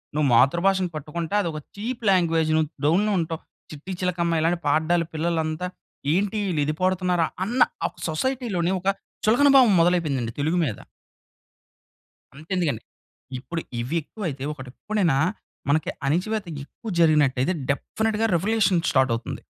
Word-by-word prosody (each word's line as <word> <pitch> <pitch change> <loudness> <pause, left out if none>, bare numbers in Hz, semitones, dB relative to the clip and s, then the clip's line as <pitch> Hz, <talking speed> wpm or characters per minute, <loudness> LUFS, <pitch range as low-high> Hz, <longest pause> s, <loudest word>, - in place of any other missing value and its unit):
నువ్వు 150 -1 +2
మాతృభాషను 175 +8 +3
పట్టుకుంటే, 155 +4 -5
అదొక 165 -5 -3 0.2
చీప్ 235 +3 -4
లాంగ్వేజ్ 165 -4 +3
నువ్వు 155 -1 +1 0.2
డౌన్‌లో 190 +8 +3
ఉంటావు. 165 -1 -3 0.3
'చిట్టి 155 +5 -8
చిలకమ్మ' 170 -2 0
ఇలాంటి 170 +2 +1
పాడడాలు 160 +3 +2
పిల్లలంతా 160 +1 -1 0.5
ఏంటి 200 +4 0
వీళ్ళు 165 -5 0
ఇది 150 - 0
పాడుతున్నారా! 180 -2 +2 0.2
అన్న 240 +5 -1 0.3
ఆహ్, - - -12
సొసైటీ‌లోనే 195 -1 -1
ఒక 190 - +1 0.4
చులకన 285 +6 +5
భావం 250 -5 +6
మొదలైపోయిందండి 155 -9 +1
తెలుగు 160 +5 +1
మీద. 115 -7 -3 1.6
అంతెందుకండి. 160 - -2 0.6
ఇప్పుడు 165 +6 -5 0.2
ఇవి 130 +8 -2
ఎక్కువైతే, 150 -6 -5
ఒకటి 130 -4 -9
ఎప్పుడైనా 195 -8 0 0.5
మనకి 155 +2 +2 0.2
అణిచివేత 195 +8 0 0.2
ఎక్కువ 220 +9 -9
జరిగినట్టయితే, 150 -3 +3 0.2
డెఫినిట్‌గా 220 +9 0
రివల్యూషన్ 195 0 +2
స్టార్ట్ 130 -2 +3
అవుతుంది. 115 - -5
170 Hz, 125 wpm, -24 LUFS, 155-195 Hz, 1.6 s, భావం